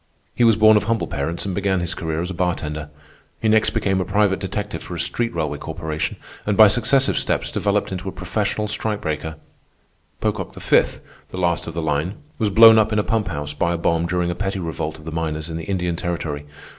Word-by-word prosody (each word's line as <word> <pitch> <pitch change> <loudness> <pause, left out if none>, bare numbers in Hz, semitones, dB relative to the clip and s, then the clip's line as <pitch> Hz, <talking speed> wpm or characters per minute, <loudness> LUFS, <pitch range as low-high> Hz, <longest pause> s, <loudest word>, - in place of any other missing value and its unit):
He 120 - +1
was 115 -2 +6
born 110 0 +6
of - - 0
humble 115 0 0
parents, 80 +4 -3
and 95 - -2
began 95 -1 0
his 85 0 -2
career 80 -2 -3
as 90 - -4
a - - -4
bartender. 75 -4 -2 0.5
He 110 - 0
next 110 0 +4
became 95 -4 0
a - - +1
private 100 +1 +2
detective 105 +2 -4
for 90 - -7
a - - -5
street 115 +7 0
railway 75 -3 -2
corporation, 80 -1 -3 0.3
and 105 -1 -1
by 110 -2 +9
successive 120 +5 +2
steps - - -1
developed 105 -1 0
into 95 0 -4
a - - -6
professional 105 +3 -2
strikebreaker. 80 -8 -2 0.8
Pocock - - -2
V., - - +4 0.5
the - - -8
last 85 -2 0
of 85 - -6
the 85 - -2
line, 80 +6 -1 0.2
was 110 -3 +2
blown 110 +2 +8
up 110 0 +2
in 105 - +1
a 105 - +2
pump 110 -1 0
house 75 -2 -4
by 85 +3 0
a - - -1
bomb 85 0 +1
during 90 0 0
a - - -1
petty 95 +1 -3
revolt 80 -3 -4
of 75 - -15
the 80 - -5
miners 80 0 -3
in 80 - -4
the 80 - -6
Indian 90 -2 -1
Territory. 80 -4 -4
90 Hz, 220 wpm, -21 LUFS, 80-105 Hz, 0.8 s, by